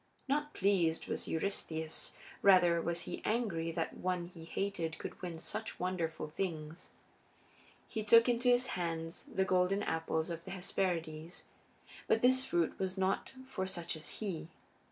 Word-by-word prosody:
Not 295 +2 0
pleased 180 -5 +2
was - - -3
Eurystheus; 160 -2 -2 0.3
rather 175 -4 +6
was 170 +1 -1
he - - -5
angry 195 -8 0
that 165 -1 -1
one 180 -1 -1
he 170 -2 -11
hated 165 -3 -2
could - - -7
win 175 -3 -4
such 215 +7 -4
wonderful 175 -4 -1
things. 160 -1 -4 1.0
He 220 -2 -3
took 230 +3 +7
into 245 +1 +3
his 245 +1 +5
hands 165 -2 -3
the 190 - +2
golden 185 +2 +3
apples 160 0 0
of 165 0 -5
the - - -9
Hesperides. 175 -3 -2 0.6
But 225 - +3
this 260 +1 +5
fruit 170 -10 0
was 190 0 -1
not 190 +5 0
for 190 -8 -2
such 170 -2 -3
as 155 -1 -6
he. 190 -7 -3
180 Hz, 150 wpm, -34 LUFS, 165-200 Hz, 1.0 s, took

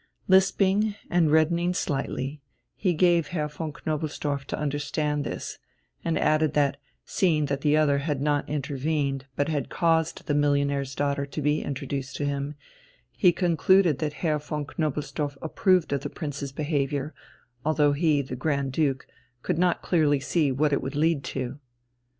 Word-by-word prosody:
Lisping 195 +2 +3 0.2
and 170 -3 +3
reddening 170 +3 +3
slightly, 140 -2 -2 0.3
he 180 -4 0
gave 170 -2 +3
Herr 155 -2 -2
von 150 +1 -5
Knobelsdorff 150 -2 -3
to - - -4
understand 150 0 -1
this, - - -5 0.4
and 165 -1 0
added 155 0 +2
that, 140 -1 +2 0.3
seeing 160 -6 +2
that 140 -1 -2
the 150 0 +3
other 145 -2 +3
had 145 -1 -2
not 145 0 0
intervened, 140 -1 -2
but 145 +2 0
had 150 -4 -2
caused 165 -1 +1
the 145 - 0
millionaire's 140 -2 +1
daughter 140 0 -1
to 140 - -6
be 150 +1 +1
introduced 140 -1 -4
to 145 - -2
him, 140 +1 -2 0.6
he 180 -5 +4
concluded 175 -2 +3
that 150 -2 -2
Herr 155 -2 +2
von 150 0 -4
Knobelsdorff 145 -1 -3
approved 180 0 +2
of 140 - 0
the 145 - -4
Prince's 145 -3 -5
behaviour, 145 0 -1 0.5
although 150 -1 +3
he, 150 -1 +2
the 130 -1 -6
Grand 140 0 -1
Duke, 135 -3 0 0.4
could - - -1
not 180 -1 +2
clearly 150 -5 +3
see 145 +1 +1
what 145 +3 +1
it - - +1
would 135 - -5
lead 155 -1 +2
to. 130 +1 -4
150 Hz, 155 wpm, -26 LUFS, 140-160 Hz, 0.6 s, he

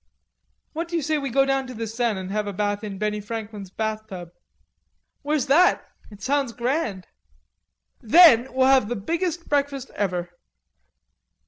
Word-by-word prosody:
"What 330 +2 -3
do 340 - -5
you 330 - 0
say 310 +1 0
we 275 -1 -3
go 270 +2 +3
down 270 -1 0
to 255 - -8
the 225 +1 -4
Seine 225 -2 -1
and 190 0 -6
have 210 0 -1
a 200 - -4
bath 205 +2 -2
in 200 -2 -6
Benny 210 +1 -2
Franklin's 210 -2 -7
bathtub?" 215 -4 -5 0.9
"Where's 295 -2 0
that? 325 +7 +4 0.2
It 205 -2 -14
sounds 275 -3 0
grand." 240 - -2 1.0
"Then 260 -1 +6
we'll 260 0 +2
have 265 -5 +4
the 240 - -1
biggest 335 - -3
breakfast 280 -2 -1
ever." 180 -3 -2
235 Hz, 155 wpm, -24 LUFS, 205-280 Hz, 1.0 s, Then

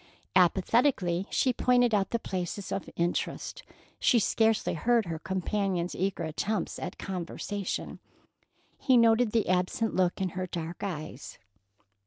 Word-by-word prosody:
Apathetically 185 0 +3
she 255 - +2
pointed 245 -1 +3
out 200 -2 +2
the 235 - 0
places 185 -2 -4
of 195 - -3
interest. 175 - -2 0.4
She 245 - +4
scarcely 220 0 +2
heard 230 +6 +2
her 165 -2 -4
companion's 190 -1 -1
eager 190 -1 -2
attempts 170 +5 -2
at 180 - -5
conversation. 190 +2 -4 0.8
He 260 -2 +4
noted 230 0 +4
the 225 -1 +1
absent 185 +5 0
look 180 -1 +1
in 190 -1 0
her 185 +1 -4
dark 170 -1 -5
eyes. 155 -8 -6
190 Hz, 130 wpm, -29 LUFS, 175-225 Hz, 0.8 s, She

